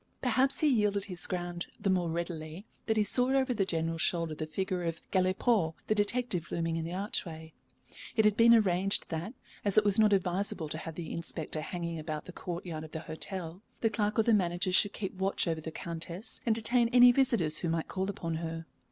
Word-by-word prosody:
Perhaps 260 +2 +2
he 310 - +4
yielded 210 -6 +2
his 180 -3 -6
ground 175 -1 -4
the - - -2
more 180 -2 +1
readily 165 +1 -5 0.2
that 220 -1 +1
he 215 - +4
saw 250 +5 +2
over 260 -1 +1
the 200 -4 0
General's 165 -1 -1
shoulder 165 -2 +1
the 155 0 -5
figure 185 +3 -2
of 165 -1 -3
Galipaud 185 -2 +2
the - - +2
detective 205 -4 -1
looming 165 -1 -1
in 165 - -2
the 170 - -5
archway. 165 -4 -4 0.6
It 220 - +3
had 210 -1 +4
been 235 +1 +7
arranged 195 -2 +1
that, 175 +9 -4 0.3
as 200 -1 +2
it 215 - +6
was 205 +1 +4
not 215 -1 +5
advisable 185 -3 0
to 155 - -2
have 165 0 -7
the 165 -2 -6
inspector 160 -2 -3
hanging 170 0 -4
about 155 -1 -5
the - - -8
courtyard 170 -3 -5
of 155 - -11
the 160 - -4
hotel, 175 +2 -5 0.2
the 225 - +2
clerk 210 -1 -1
or 225 - +5
the 230 - +3
manager 180 -2 +1
should 200 +2 +4
keep 195 -3 -4
watch 190 0 0
over 160 -1 -1
the 160 - -5
Countess 170 +5 -6
and 225 - +3
detain 235 +1 +2
any 245 0 +8
visitors 235 - +3
who 170 - -2
might 165 0 -1
call 190 +1 -2
upon 165 -4 -3
her. 165 0 -5
180 Hz, 210 wpm, -30 LUFS, 165-210 Hz, 0.6 s, any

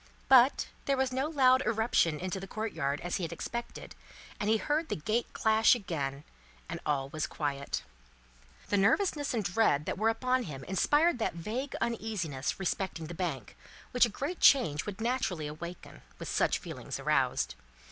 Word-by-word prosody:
But, 260 0 +6 0.2
there 275 -1 +1
was 265 0 +1
no 265 +3 0
loud 260 -4 +5
irruption 220 -9 +1
into 185 +1 -3
the 195 - -7
courtyard, 160 -10 -2
as 175 +1 -2
he 185 - -4
had 165 - -3
expected, 235 0 -6 0.5
and 210 -2 0
he 220 - +4
heard 305 +7 -1
the - - 0
gate 215 +9 -1
clash 220 +2 +4
again, 145 - -4 0.4
and - - -5
all 135 -2 0
was 155 +2 -2
quiet. 140 -2 -3 0.9
The 205 - +2
nervousness 290 - +2
and 220 - 0
dread 175 -6 +2
that - - -3
were 220 +1 +3
upon 255 +3 +1
him 140 - -7
inspired 295 - +2
that 220 - -1
vague 230 +11 -4
uneasiness 200 - -2
respecting 190 -3 -2
the 170 - -7
Bank, 160 - -4 0.4
which 250 -1 +5
a - - -7
great 285 - -4
change 160 - +4
would 205 +1 -6
naturally 230 -10 -1
awaken, 170 +4 -8 0.2
with - - -7
such - - +2
feelings - - -7
roused. - - +1
210 Hz, 165 wpm, -30 LUFS, 160-250 Hz, 0.9 s, But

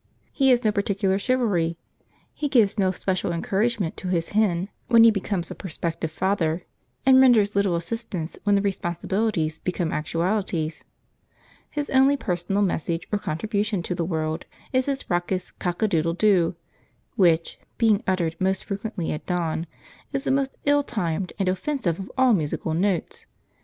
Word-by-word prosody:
He 270 -2 +3
has 250 -1 +4
no 215 - +3
particular 200 -1 0
chivalry. 200 -10 +1 0.6
He 295 - -2
gives 225 -6 +3
no 190 -1 +3
special 185 -1 -1
encouragement 195 +2 0
to 185 - -5
his 170 -2 0
hen 200 -3 +1 0.2
when 230 -1 +7
he 230 - +8
becomes 195 -3 -2
a - - -3
prospective 165 -2 -3
father, 175 -1 0 0.4
and 260 0 +7
renders 220 -6 +5
little 200 -3 +2
assistance 175 -2 -4
when 205 -1 +3
the 200 - +2
responsibilities 175 -2 -1
become 175 -2 -2
actualities. 165 0 -1 0.9
His 295 -1 -4
only 270 +2 +5
personal 190 -1 -1
message 170 -1 -1
or 210 - +1
contribution 200 +3 -1
to 180 - -2
the 175 -1 -2
world 160 -1 -2 0.3
is 255 +1 +2
his 275 -1 -2
raucous 180 +1 -1
cock 175 +3 -3
a - - +4
doodle 165 -3 +1
doo, 185 -4 +3 0.6
which, 170 -3 +2 0.2
being 220 -3 +3
uttered 175 -4 0
most 190 0 0
frequently 200 -3 -3
at 150 - -5
dawn, 170 -2 -1 0.5
is 275 0 -1
the - - 0
most 270 0 0
ill 290 0 +4
timed 180 - -2
and 195 -3 0
offensive 190 - -1
of 190 - -7
all 260 -2 +5
musical 155 -2 -1
notes. 180 +1 -1
190 Hz, 155 wpm, -24 LUFS, 170-220 Hz, 0.9 s, he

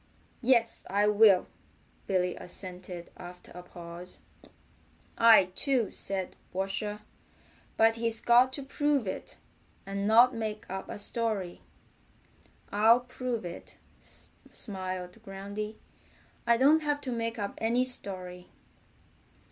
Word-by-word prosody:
"Yes, 235 -2 +2
I 205 +2 +2
will," 210 -3 +6 0.6
Billy 180 -2 +1
assented 180 -1 -8
after 180 0 -11
a 180 - -9
pause. 175 0 -10 0.9
"I 225 -5 +6
too," 260 -4 +1
said 190 -2 -4 0.2
Washer, 195 +3 -2 0.8
"but 225 0 +4
he's 230 -1 +3
got 245 +2 +5
to 280 - -5
prove 285 -2 0
it, 185 - -6 0.5
and 200 +1 -2
not 240 +4 +6
make 215 -2 -4
up 190 0 -5
a - - -5
story." 205 -4 -2 1.1
"I'll 225 +4 +5
prove 245 -3 -4
it," 175 0 -9 0.7
smiled 185 -1 -4
Groundy. 205 +1 -6 0.7
"I 235 0 +5
don't 285 +6 +5
have 295 -1 0
to 260 - -4
make 230 0 -2
up 200 -2 -3
any 235 +3 +2
story. 185 -7 -6
210 Hz, 115 wpm, -29 LUFS, 185-235 Hz, 1.1 s, will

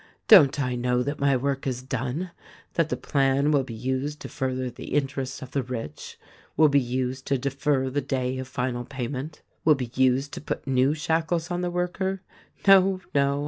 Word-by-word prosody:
Don't 145 0 +8
I 125 -2 0
know 125 0 0
that 145 +3 -3
my 140 -1 +3
work 135 +1 -2
is 130 -1 -3
done 130 +7 -3 0.2
— - - -25
that 165 -2 +1
the - - -1
plan 140 0 +1
will 145 -2 +4
be 120 -3 -8
used 130 +5 -2
to - - -7
further 130 -1 -2
the - - -6
interests 135 -2 -2
of 130 - -10
the 140 - 0
rich, 115 -11 -7 0.4
will 155 -1 +6
be 140 0 +4
used 130 +1 -3
to 140 - +2
defer 135 +1 0
the 140 +2 -1
day 130 -1 -2
of 130 - -5
final 125 -2 -2
payment, 135 +4 -5 0.2
will 155 -1 +5
be 125 -4 -5
used 130 +2 +2
to - - -6
put - - -4
new 135 +2 +2
shackles 165 +2 -1
on 175 0 -1
the 180 - -1
worker? 185 +2 -2 0.4
No, 195 -1 +6
no 140 0 +2
135 Hz, 195 wpm, -26 LUFS, 130-150 Hz, 0.4 s, Don't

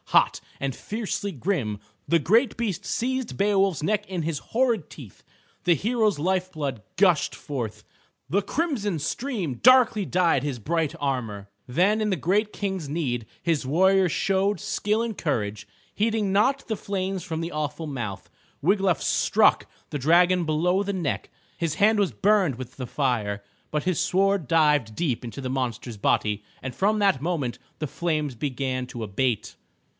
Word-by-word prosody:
Hot, - - +3 0.2
and 135 -2 -2
fiercely 210 -2 -3
grim 135 - -2 0.3
the 170 - +4
great 220 - +3
beast 200 -5 -2
seized 260 0 -2
Beowulf's 195 -5 +2
neck 210 +4 +1
in 180 -4 -2
his 155 -3 -2
horrid 235 - 0
teeth. 120 - -12 0.4
The 175 -1 +4
hero's 215 - +1
life 185 +3 0
blood 140 - -3 0.2
gushed 180 -4 +3
forth, 125 -7 -5 0.4
the 195 +7 +2
crimson 210 - -1
stream 190 - -3
darkly 245 -4 +6
dyed 170 -7 +2
his 140 -4 -3
bright 160 +5 -1
armor. 115 -8 -3 0.2
Then 185 - +2
in 215 - +1
the 190 - +1
great 205 - +1
King's 190 -7 -3
need 130 -7 -2 0.2
his 165 -5 0
warrior 190 +6 +4
showed 195 +4 +1
skill 210 +2 0
and 230 -3 -3
courage. 105 -8 -2 0.3
Heeding 215 -2 0
not 265 +7 +2
the 220 - -1
flames 190 -2 -3
from 160 -2 -4
the 165 +1 -3
awful 150 +1 -3
mouth, 120 -9 -5 0.3
Wiglaf 195 +1 +2
struck - - +3 0.2
the 145 - -2
dragon 175 +5 +4
below 175 +5 +2
the 200 0 -2
neck. 175 -7 -2 0.3
His 165 -3 -1
hand 210 +4 +4
was 200 -3 +2
burned 195 - +2
with 125 0 -8
the 130 -2 -5
fire, 110 -7 -1 0.3
but 150 -1 -1
his 185 -3 0
sword 195 -3 +2
dived 150 -8 +3
deep 135 -8 -1
into 115 +1 -7
the 130 - -3
monster's 125 -3 -3
body 105 0 +1 0.2
and 130 -2 -5
from 210 +2 +2
that 195 -10 +3
moment 145 -8 -2 0.2
the 155 - -2
flames 155 -3 -2
began 130 0 -2
to 120 -2 -6
abate. 110 +2 -1
170 Hz, 160 wpm, -25 LUFS, 135-200 Hz, 0.4 s, darkly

